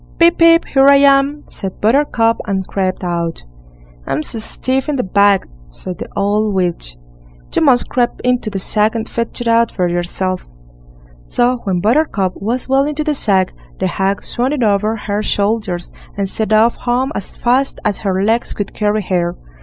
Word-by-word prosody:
"Pip, 340 0 +4
pip! 330 0 +6
here 270 0 +3
I 280 - +8
am", 280 +1 +3
said 190 -2 -5
Buttercup, 230 -1 +2
and 190 -2 -1
crept 185 -1 -2
out. 170 -2 -3 0.6
"I'm 150 +3 -1
so 225 - -2
stiff 260 +5 -2
in 295 - 0
the 255 - -1
back", 200 0 +3 0.2
said 175 - -8
the - - -6
old 205 +1 0
witch, 170 - -2 0.6
"you - - +3
must 255 -5 +4
creep 245 -1 +1
into 250 -3 +1
the 200 - -4
sack 210 +3 +2
and 225 0 -3
fetch 230 +1 -2
it 240 - -3
out 230 0 +3
for 180 -2 0
yourself." 175 +1 -2 0.8
So 245 +1 +1
when 185 -3 0
Buttercup 215 - +1
was 235 +5 -2
well 270 +1 +3
into 300 +1 -2
the 305 0 0
sack, 195 -8 +2 0.3
the 190 - 0
hag 195 +2 -1
swung 250 +4 -1
it 270 -5 -1
over 210 +1 +1
her 205 0 -1
shoulders 200 -4 -1 0.3
and 200 -1 -1
set 215 +3 -3
off 220 +2 +4
home 255 +3 -1
as 200 - -6
fast 255 +3 +1
as 210 -1 0
her 195 -2 -1
legs 225 +3 +1
could 205 - -5
carry 210 0 0
her. 175 -2 -1
215 Hz, 180 wpm, -16 LUFS, 190-250 Hz, 0.8 s, I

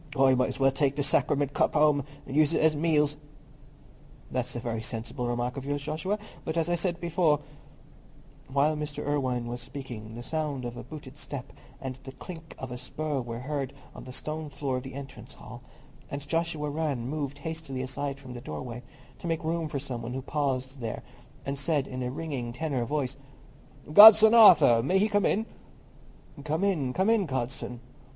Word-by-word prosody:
I 135 0 +6
might 130 +1 +2
as 130 +1 -6
well 135 0 +5
take 135 0 +1
the 145 - 0
Sacriment 140 0 +1
cup - - +2
home 150 -2 +4 0.2
and 135 - -6
use 155 +1 +4
it - - +2
at 160 0 +5
meals." 150 -1 +2 1.1
"That's 125 -1 -2
a - - -2
very 115 -2 -3
sensible 120 +2 -4
remark 120 +2 -2
of 135 - -4
yours, 145 +1 -2
Joshua; 160 +7 -2 0.3
but, 160 +1 -3
as 165 0 +1
I - - +2
said 175 0 -1
before——" 170 -3 +2 1.1
While 145 +3 +3
Mr. 150 -1 -4
Irwine 130 -4 0
was 120 +1 -5
speaking, 120 -5 -8
the 120 - -7
sound 150 -3 -2
of 120 0 -5
a - - -7
booted 145 -2 -10
step 140 -4 -7 0.3
and 130 -2 -5
the 135 - -9
clink 165 +2 -10
of 130 -1 -7
a 125 - -5
spur 145 +2 -3
were 120 0 -6
heard 140 -1 -3 0.2
on - - -10
the 130 - -8
stone 155 +3 -4
floor 135 -2 -2
of - - -3
the 135 0 -8
entrance 140 0 -9
hall, - - -11 0.5
and 140 0 -6
Joshua 165 -2 -1
Rann 145 -6 -2
moved 140 -1 -3
hastily 145 -3 -5
aside 135 +1 -4
from 130 -2 -9
the 120 - -7
doorway 120 +10 -6 0.4
to - - -6
make 165 -1 -1
room 165 0 -1
for 150 - -3
some 130 -4 -5
one 120 +1 -5
who 130 - -4
paused 135 -2 -2
there, 115 -3 -4 0.4
and 140 0 -3
said, 145 -2 +1
in 130 0 -5
a 125 - -1
ringing 130 -4 -4
tenor 135 -2 -1
voice, 135 -1 -2 0.8
"Godson 220 +3 +11
Arthur—may 180 - +7
he 205 +3 +3
come 205 -2 +2
in?" 220 +2 +1 1.0
"Come 155 +5 -1
in, 160 -10 +1
come 190 - +2
in, 210 -6 +2
godson!" 125 -2 -4
140 Hz, 190 wpm, -28 LUFS, 130-155 Hz, 1.1 s, Godson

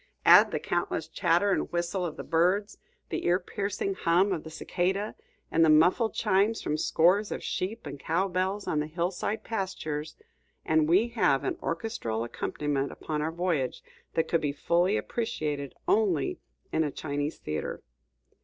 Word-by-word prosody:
Add - - +8
the - - -2
countless 175 -2 -2
chatter 175 +4 +2
and - - 0
whistle 175 +2 -1
of 155 - -8
the - - -5
birds, 185 +5 +1 0.3
the - - -3
ear 175 +1 +4
piercing 195 +1 -3
hum 185 +2 +2
of 160 - -4
the 160 - -8
cicada, 190 +5 -1 0.4
and 165 - +4
the 160 - +5
muffled 175 +9 +4
chimes 210 +1 +2
from 150 - -1
scores 180 +7 +3
of - - -4
sheep 215 +4 -3
and 145 -1 -7
cow 170 +7 0
bells 190 +2 -1
on 150 - +1
the 150 - -1
hillside 175 +6 -2
pastures, 155 -8 -4 0.5
and 155 0 +3
we 200 +8 +4
have 145 - +2
an - - -1
orchestral 165 - -2
accompaniment 140 +4 -2
upon 150 -1 -4
our 155 +2 -1
voyage 165 -7 -1 0.3
that 165 - +1
could 165 - +1
be 145 -2 0
fully 175 +7 +1
appreciated 150 - -3
only 180 - +2 0.3
in 160 - +2
a 150 - -1
Chinese 145 +1 -3
theatre. 75 0 -4
170 Hz, 165 wpm, -28 LUFS, 155-195 Hz, 0.5 s, Add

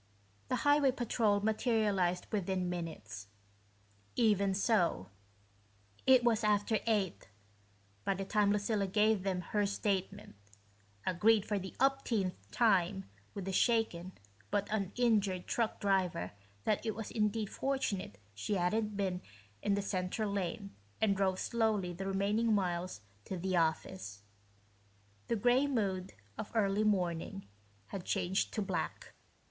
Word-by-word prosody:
The - - 0
highway 290 -1 +5
patrol 225 -4 +1
materialized 210 -5 +1
within 190 -3 -1
minutes. 110 - -6 0.9
Even 200 -4 +3
so, 175 - +1 1.0
it 260 -2 +7
was 235 -2 +2
after 210 +1 +2
eight 200 - 0 0.7
by 195 - +1
the 195 +1 -4
time 205 0 +2
Lucilla 205 -1 +1
gave 210 +1 +3
them 185 -1 -1
her 205 +3 0
statement, 200 0 -2 0.7
agreed 205 +4 +3
for 205 -2 -1
the 190 0 -8
umpteenth 245 -8 0
time 195 -4 +2 0.2
with 195 -2 -4
the 195 - -2
shaken 190 -4 +1 0.4
but 205 - 0
uninjured 205 -2 +1
truck 230 -2 -1
driver 185 - +1 0.3
that 210 - +1
it 220 -2 -2
was 225 -1 -6
indeed 210 -1 0
fortunate 240 - -2 0.2
she 100 - -2
hadn't 210 +3 0
been 185 -2 -1 0.4
in 200 - +2
the 200 - -1
center 185 +2 -1
lane, 200 0 -3 0.3
and 210 -3 +3
drove 190 -1 +1
slowly 215 -5 0
the 195 +3 -5
remaining 210 +3 +2
miles 180 - -1 0.2
to 190 - -4
the 185 +1 -1
office. 160 - -1 1.0
The - - +1
gray 245 +6 +3
mood 195 -8 -1 0.3
of - - -5
early 205 -1 +2
morning 195 -1 0 0.4
had 195 -3 -5
changed 190 0 0
to 215 - 0
black. 190 -3 -4
200 Hz, 130 wpm, -33 LUFS, 185-220 Hz, 1.0 s, it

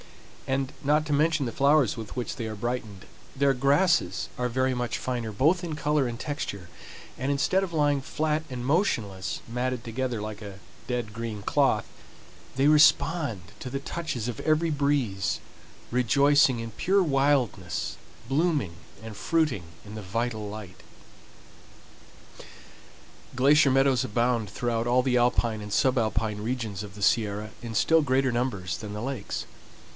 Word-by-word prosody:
And, 135 0 -1
not 150 +2 +2
to 150 - -1
mention 155 0 +2
the 120 - -3
flowers 140 -2 +3
with 110 -2 -8
which 125 - -3
they 115 - -4
are 110 - -5
brightened, 110 -3 -4 0.3
their 140 0 +3
grasses 140 - +2
are 125 0 -1
very 130 +2 +1
much 125 -2 -2
finer 120 -3 -3
both 160 - +2
in 165 -3 -3
color 150 -3 +1
and 120 0 -5
texture, 105 - -4 0.5
and 135 +3 -1
instead 185 +7 +2
of 185 - -4
lying 145 -3 +2
flat 155 +3 -1
and 125 -1 -5
motionless, 115 - 0
matted 125 0 -2
together 125 0 -3
like 105 0 -6
a 100 -2 -9 0.3
dead 120 -4 -3
green 110 -3 -5
cloth, - - +2 0.7
they 135 +2 +4
respond 150 - +4 0.2
to 125 - -6
the 135 +2 -3
touches 145 -6 -4
of 120 -3 -4
every 155 +1 +2
breeze, 140 -10 0 0.5
rejoicing 130 +2 +4
in 115 0 -5
pure 190 - +2
wildness, 135 - 0 0.3
blooming 145 - +1 0.3
and 110 -1 -8
fruiting 155 - 0 0.2
in 105 - -10
the 110 - -6
vital 110 +2 -3
light. 105 -3 -9 2.5
Glacier 140 +2 +5
meadows 135 -2 +3
abound 115 -1 0
throughout 115 +3 -1
all 125 +1 +3
the 125 -1 +1
alpine 120 -2 +2
and 105 0 -8
subalpine 110 -4 +1
regions 115 -5 -3
of 100 -1 -10
the 100 - -6
Sierra 105 -1 +1
in 115 -1 -6
still 160 +8 +4
greater 130 -2 +2
numbers 100 -8 -1
than 105 -2 -7
the 105 - -5
lakes. 135 0 -4
125 Hz, 150 wpm, -27 LUFS, 110-145 Hz, 2.5 s, Glacier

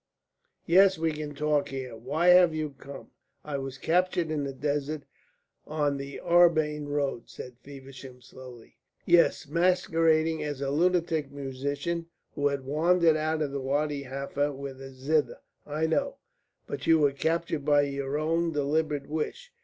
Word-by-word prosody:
"Yes, 190 +2 +5
we 160 0 0
can 150 -1 -6
talk 150 0 0
here. 130 -3 -6
Why 145 +10 0
have 180 -2 +6
you 155 -1 -2
come?" 140 +1 -11 0.3
"I 145 -2 -3
was 135 0 -6
captured 175 0 +1
in 150 -2 -1
the 140 - -3
desert, 145 +2 -2 0.6
on 145 -2 0
the 140 0 -7
Arbain 155 -4 +3
road," 140 -4 -2
said 125 -1 -10
Feversham, 135 -1 -11
slowly. 125 -2 -14 0.3
"Yes, 170 -3 +3
masquerading 165 -1 +2
as 145 -2 -4
a 140 -1 -2
lunatic 165 -2 +1
musician 140 +5 -4 0.3
who 145 - +1
had 140 -2 -3
wandered 165 +3 +3
out 155 0 0
of 145 - -3
Wadi 140 +2 -1
Halfa 140 +2 -2
with 135 -1 -8
a 135 - -8
zither. 145 +4 0 0.3
I 150 +2 -1
know. 275 - 0 0.5
But - - -6
you 165 - +6
were 145 -2 +3
captured 160 +1 -1
by 145 0 +4
your 140 0 -3
own 165 +2 0
deliberate 150 0 0
wish. 475 - -4
150 Hz, 150 wpm, -28 LUFS, 140-160 Hz, 0.6 s, have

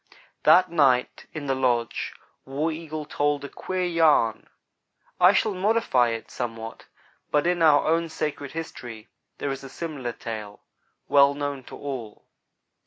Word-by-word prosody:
That 185 -1 +6
night 135 -6 +2
in 155 -2 -6
the 135 - +1
lodge 125 -3 0 0.3
War 145 +5 -2
Eagle 155 -1 -6
told 145 0 0
a - - -7
queer 185 0 -3
yarn. 160 -10 +2 0.7
I 180 +1 +8
shall 210 +1 +1
modify 185 - +2
it 115 -1 -5
somewhat, 115 -2 -6 0.4
but 150 +1 +2
in 175 0 +1
our 150 -3 +5
own 165 +1 +1
sacred 150 -3 -4
history 120 -8 -7 0.3
there 140 - -2
is 135 0 -5
a 135 - -8
similar 140 -6 -5
tale, 105 -3 -7 0.4
well 140 0 +5
known 145 -2 -3
to - - -10
all. 130 -7 -7
145 Hz, 145 wpm, -25 LUFS, 125-165 Hz, 0.7 s, I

